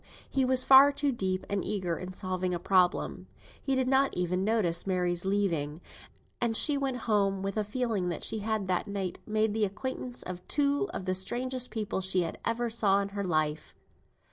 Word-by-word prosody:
he 270 - 0
was 255 0 +3
far 270 +1 +8
too 285 0 0
deep 190 -6 -2
and 200 -2 -1
eager 185 -5 -2
in 185 +2 -7
solving 185 -1 -2
a - - -4
problem. 165 - +1 0.3
He 270 -1 0
did 260 -1 +1
not 270 -2 +2
even 180 +1 0
notice 195 -5 +1
Mary's 180 -1 0
leave 200 0 +1
taking, 150 -1 -3 0.6
and 230 -2 +2
she 295 - +5
went 270 -2 -1
home 195 -3 +1
with 195 0 -2
the 215 - 0
feeling 210 -4 -2
that 170 - -4
she 220 - +1
had 215 -2 -2
that 185 +3 -1
night 195 -3 -4
made 215 0 +1
the 220 0 0
acquaintance 245 +4 -4
of 180 -1 -6
two 285 +6 +1
of 185 - -5
the 185 - 0
strangest 250 +7 0
people 215 -4 -3
she 185 -1 +1 0.2
ever 240 +1 -1
saw 210 -4 +2
in 200 0 -2
her 200 0 -4
life. 155 -3 -1
200 Hz, 195 wpm, -29 LUFS, 185-240 Hz, 0.6 s, far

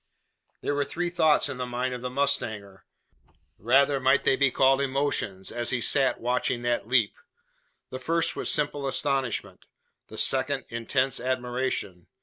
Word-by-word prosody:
There - - -1
were 145 0 +1
three 175 +5 -3
thoughts 160 -4 +3
in 130 - -6
the 125 0 -3
mind 125 +1 -2
of 125 - -6
the 125 - -3
mustanger 110 -8 -2 0.7
rather 135 +5 +3
might 130 +1 +3
they 135 - +3
be 140 0 +3
called 135 +2 +3
emotions 135 -8 -1
as 120 -1 -2
he 130 - 0
sate 135 +2 +2
watching 120 0 -1
that 120 -2 -1
leap. 120 -4 +2 0.7
The 130 - -5
first 165 +5 0
was - - -2
simple 145 -1 0
astonishment; 135 -2 -2 0.4
the - - -11
second, 135 0 +1
intense 130 +3 0
admiration. 125 -7 -3
130 Hz, 150 wpm, -26 LUFS, 120-140 Hz, 0.7 s, thoughts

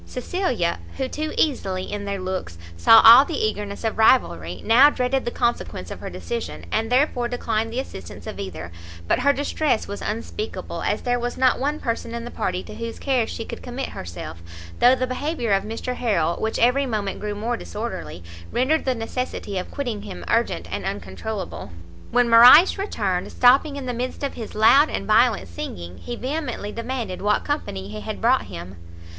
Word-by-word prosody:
Cecilia, 250 - -1 0.2
who, 265 -1 -1
too 310 +4 -4
easily, 195 -11 0
in 205 +1 -5
their 200 -1 -3
looks, 185 - -4 0.2
saw 225 - +7
all 230 +4 +10
the 300 0 -4
eagerness 210 -1 -2
of 225 0 -2
rivalry, 235 +3 +3
now 250 +6 +7
dreaded 260 -1 -1
the - - 0
consequence 240 0 -2
of - - -7
her - - -6
decision, 475 -1 -5
and 225 +2 -1
therefore 250 -2 +2
declined 225 -2 -2
the 240 - -2
assistance 95 - -8
of - - -7
either; 85 -3 -6 0.4
but - - +2
her 280 +3 +4
distress 285 -2 0
was 200 - -6
unspeakable, 230 - -5
as - - -1
there 245 0 0
was 245 0 -3
not 255 -1 +3
one 295 +3 -1
person 230 0 -3
in 235 0 -5
the 240 - -7
party 185 0 -2
to - - -10
whose 230 0 -6
care 255 -5 0
she 225 - -5
could - - -8
commit 250 +2 -5
herself, 85 -1 -8 0.4
though 250 +2 +6
the 255 - -1
behaviour 255 -2 -2
of 195 - +3
Mr 225 +4 -4
Harrel, 195 -10 0
which 220 0 -2
every 260 +4 +3
moment 210 -4 -2
grew 210 0 -4
more 230 +4 -2
disorderly, 90 - -6 0.3
rendered 280 +6 +1
the 260 -1 +1
necessity 225 -4 -4
of 180 - -6
quitting 240 -7 -4
him 90 - -8
urgent - - 0
and - - -3
uncontroulable. 190 - -5 0.4
When 245 0 +3
Morrice 250 +12 +8
returned, 200 - -2
stopping 270 +4 +4
in 280 -2 -5
the 250 - -2
midst 250 +4 -4
of 280 - -2
his 225 -3 -8
loud 270 +8 +6
and 195 - -3
violent 225 +3 +3
singing, 85 +1 -7
he 240 - -6
vehemently 260 -5 -4
demanded 230 -4 -4
what 210 +1 +1
company 95 - -3
he 105 0 -7
had - - -5
brought - - +2
him? 85 +2 -9
230 Hz, 185 wpm, -23 LUFS, 200-260 Hz, 0.4 s, all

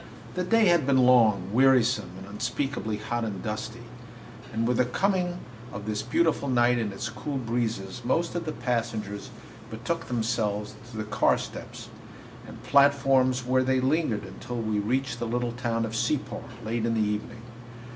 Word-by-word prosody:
The 180 - -1
day 225 +4 +4
had 170 -7 +4
been 130 -2 +5
long, 110 -6 +4
wearisome, 130 -4 +4
and - - -9
unspeakably 115 +1 -2
hot 115 +2 -3
and 105 -4 -4
dusty; 105 -1 -5 0.7
and 115 +1 0
with 125 -1 +1
the 125 - +4
coming 180 +6 0 0.3
of 100 +1 -7
this 105 0 -2
beautiful 145 +2 +1
night 120 -1 +3
and 110 -3 -1
its 100 +2 -4
cool 135 +5 -4
breezes 115 -4 -2
most 165 +8 0
of 175 - -3
the - - 0
passengers 115 -6 -3 0.4
betook 125 +10 -3
themselves 110 -3 -1 0.2
to 115 - -9
the 110 - -2
car 105 0 +2
steps - - -8 0.6
and - - -11
platforms, 135 -2 +4
where 130 +1 +3
they 130 0 +2
lingered 130 -5 +1
until 95 +6 -7
we 110 -2 -1
reached 125 +3 -1
the 120 - -2
little 120 +1 -1
town 115 -1 -1
of 110 0 -5
Separ, 130 +4 -1 0.2
late 115 +1 -1
in 115 0 +1
the - - +1
evening. 110 +3 -4
120 Hz, 165 wpm, -27 LUFS, 110-130 Hz, 0.7 s, been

